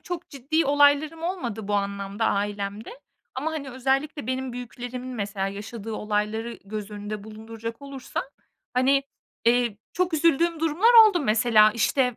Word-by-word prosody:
çok 355 Hz, -1 st, -6 dB
ciddi 290 Hz, +4 st, 0 dB
olaylarım 290 Hz, +3 st, +3 dB
olmadı 240 Hz, -, -4 dB
bu 205 Hz, -, 0 dB
anlamda 200 Hz, +1 st, -2 dB
ailemde 205 Hz, -, -2 dB, 0.3 s
ama, 295 Hz, +5 st, -2 dB
hani, 285 Hz, -4 st, -5 dB
özellikle 270 Hz, +2 st, -1 dB
benim 260 Hz, 0 st, -2 dB
büyüklerimin 245 Hz, +1 st, -7 dB
mesela 200 Hz, -3 st, -2 dB
yaşadığı 215 Hz, +2 st, -7 dB
olayları 215 Hz, +2 st, -2 dB
göz 210 Hz, 0 st, -6 dB
önünde 210 Hz, 0 st, -6 dB
bulunduracak 225 Hz, +2 st, -8 dB
olursam, 275 Hz, -2 st, -5 dB, 0.5 s
hani, 270 Hz, +2 st, +3 dB, 0.4 s
eee, 235 Hz, -2 st, +3 dB, 0.2 s
çok 360 Hz, -1 st, 0 dB
üzüldüğüm 330 Hz, +1 st, +2 dB
durumlar 330 Hz, +9 st, +3 dB, 0.2 s
oldu 360 Hz, -5 st, 0 dB
mesela, 215 Hz, -3 st, +5 dB
işte, 250 Hz, +2 st, +1 dB
245 Hz, 135 wpm, -25 LUFS, 215-290 Hz, 0.5 s, mesela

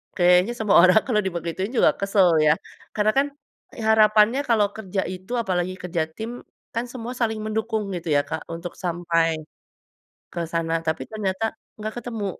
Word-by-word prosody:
kayaknya 180 Hz, +4 st, +4 dB
semua 215 Hz, -4 st, +1 dB
orang 185 Hz, +5 st, +6 dB
kalau 215 Hz, -4 st, +2 dB
dibegituin 175 Hz, +3 st, -3 dB
juga -, -, +5 dB
kesel 195 Hz, -2 st, +3 dB, 0.2 s
ya 150 Hz, -, +6 dB, 0.4 s
karena 215 Hz, 0 st, +3 dB
kan, 280 Hz, -, +4 dB, 0.6 s
harapannya 215 Hz, +2 st, +5 dB
kalau 210 Hz, -3 st, +4 dB
kerja 195 Hz, -3 st, -3 dB
itu 185 Hz, +5 st, -11 dB
apalagi 185 Hz, -3 st, -1 dB
kerja 170 Hz, -2 st, -1 dB
tim, 220 Hz, +1 st, -5 dB, 0.5 s
kan 235 Hz, +1 st, -1 dB
semua 245 Hz, -1 st, -5 dB
saling 220 Hz, -2 st, 0 dB
mendukung 220 Hz, 0 st, -1 dB
gitu 170 Hz, -1 st, -6 dB
ya 145 Hz, -, +5 dB
Kak 160 Hz, +1 st, -4 dB
untuk 170 Hz, +1 st, -6 dB
sampai. 170 Hz, -1 st, +1 dB, 1.0 s
Ke 170 Hz, -2 st, -3 dB
sana 165 Hz, 0 st, -2 dB
tapi 160 Hz, -4 st, -1 dB
ternyata 205 Hz, -1 st, -2 dB, 0.3 s
nggak 215 Hz, 0 st, -5 dB
ketemu. 225 Hz, -3 st, -5 dB
195 Hz, 155 wpm, -23 LUFS, 175-220 Hz, 1.0 s, orang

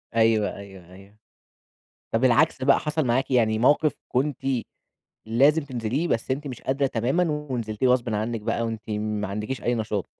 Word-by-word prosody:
أيوه، 110 Hz, -2 st, +3 dB
أيوه، 95 Hz, -3 st, -12 dB
أيوه، 100 Hz, +3 st, -16 dB, 0.9 s
طب 115 Hz, +3 st, 0 dB
العكس 130 Hz, +2 st, +3 dB
بقى، 135 Hz, 0 st, +5 dB
حصل 150 Hz, -1 st, -1 dB
معاكِ 130 Hz, +3 st, 0 dB
يعني 110 Hz, -3 st, +2 dB
موقف 145 Hz, +4 st, +3 dB
كنتِ 135 Hz, +2 st, 0 dB, 0.9 s
لازم 140 Hz, +7 st, +3 dB
تنزليه 130 Hz, +5 st, -2 dB
بس 115 Hz, -1 st, -1 dB
أنتِ 145 Hz, +3 st, -2 dB
مش 125 Hz, -3 st, -7 dB
قادرة 135 Hz, +1 st, 0 dB
تمامًا 130 Hz, +7 st, 0 dB, 0.3 s
ونزلتِيه 115 Hz, 0 st, -1 dB
غصبٍ 120 Hz, -3 st, +1 dB
عنك 110 Hz, +2 st, -2 dB
بقى 115 Hz, +2 st, -1 dB
وأنتِ 115 Hz, -1 st, -3 dB
ما 105 Hz, -1 st, -2 dB
عندكيش 105 Hz, +6 st, -4 dB
أي 120 Hz, -, +1 dB
نشاط؟ 105 Hz, -3 st, -2 dB
115 Hz, 160 wpm, -25 LUFS, 110-135 Hz, 0.9 s, بقى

